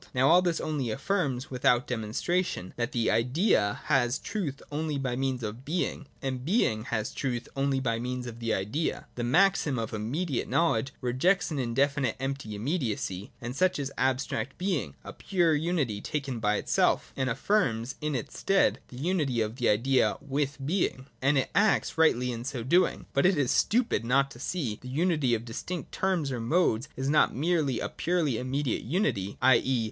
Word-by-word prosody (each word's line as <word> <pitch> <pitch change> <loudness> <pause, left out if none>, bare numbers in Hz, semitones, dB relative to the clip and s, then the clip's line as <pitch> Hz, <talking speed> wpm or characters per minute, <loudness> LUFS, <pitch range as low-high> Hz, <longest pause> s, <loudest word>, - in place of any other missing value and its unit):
Now 130 +2 +4
all 175 +2 +7
this 175 -2 0
only 145 -6 -2
affirms, 135 - -1
without 125 -1 +2
demonstration, 120 - -2
that 120 +2 -2
the 120 -3 +1
Idea 125 - +2
has 130 -4 +2
truth 185 -10 -4
only 150 0 -2
by 130 -3 -2
means 130 -1 -1
of 110 +4 -5
being, 160 -1 -2 0.2
and 130 -2 -3
being 130 - +1
has 110 -2 -2
truth 125 -3 -3
only 135 0 +1
by 115 -3 -1
means 125 +1 -3
of 115 -1 -7
the 115 -1 -2
Idea. 110 +12 -1
The 120 - -4
maxim 160 0 +3
of 115 -1 -3
immediate 130 +8 -2
knowledge 135 -6 +1
rejects 140 +11 +1
an 145 - -2
indefinite 135 +1 +1
empty 135 -5 -4
immediacy 110 - -2
(and 120 +1 -5
such 185 +5 +2
is 140 -1 -3
abstract 130 -2 -1
being, 175 - -2
or - - -7
pure 175 -4 +1
unity 150 - 0
taken 135 -5 -3
by 105 -1 +1
itself), - - +1
and 130 -1 0
affirms 125 - 0
in 150 -1 -1
its 120 - -5
stead 195 0 +3
the 125 - -11
unity 145 -5 0
of 110 +2 -1
the 120 - +2
Idea 125 +5 +2
with 140 0 -2
being. 150 -5 0 0.2
And 135 +2 +3
it 135 - 0
acts 210 +1 +2
rightly 125 -6 +3
in 115 -1 -5
so 125 -2 -4
doing. 175 +9 +2
But 140 +6 +4
it 190 -3 +2
is 135 -3 +2
stupid 230 - +2
not 135 +3 +2
to 120 - -12
see 140 -5 -2
that - - -30
the 125 - -8
unity 150 -4 +2
of 115 +1 -5
distinct 165 +9 -5
terms 180 -7 0
or 125 - -2
modes 120 -1 +1
is 135 +1 -3
not 150 +1 +3
merely 150 -3 +1
a - - -2
purely 165 -9 0
immediate 130 0 -1
unity, 120 - -1
t.e. 130 0 +4
135 Hz, 180 wpm, -28 LUFS, 120-155 Hz, 0.2 s, all